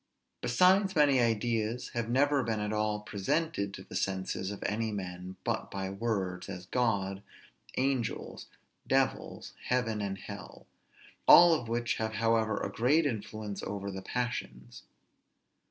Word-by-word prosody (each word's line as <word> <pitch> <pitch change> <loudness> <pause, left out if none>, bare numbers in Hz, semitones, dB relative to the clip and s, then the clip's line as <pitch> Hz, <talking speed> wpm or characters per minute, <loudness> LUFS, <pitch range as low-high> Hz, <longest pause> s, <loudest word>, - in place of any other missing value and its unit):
Besides 185 +9 +4
many 145 -4 +5
ideas 115 0 0
have 115 -1 -3
never 140 +3 +3
been 110 -3 -1
at 105 +1 -2
all 105 0 0
presented 105 +2 -1
to 95 - -9
the - - -11
senses 95 0 -2
of 100 - -6
any 110 +1 -1
men 90 -2 -6
but - - -2
by 95 -1 -4
words, 95 -4 -2
as 90 -2 -6
God, 100 -4 0 0.6
angels, 130 -3 -1 0.4
devils, - - 0
heaven, 115 -4 0
and 100 -1 -3
hell, 100 0 -10 0.6
all 175 0 +10
of 135 -7 -1
which 120 +1 -1
have 110 0 -2
however 115 -2 +1
a - - -3
great 145 +8 +3
influence 110 -4 -4
over 100 0 -4
the 95 0 -6
passions. 120 - -4
110 Hz, 140 wpm, -31 LUFS, 100-125 Hz, 0.6 s, all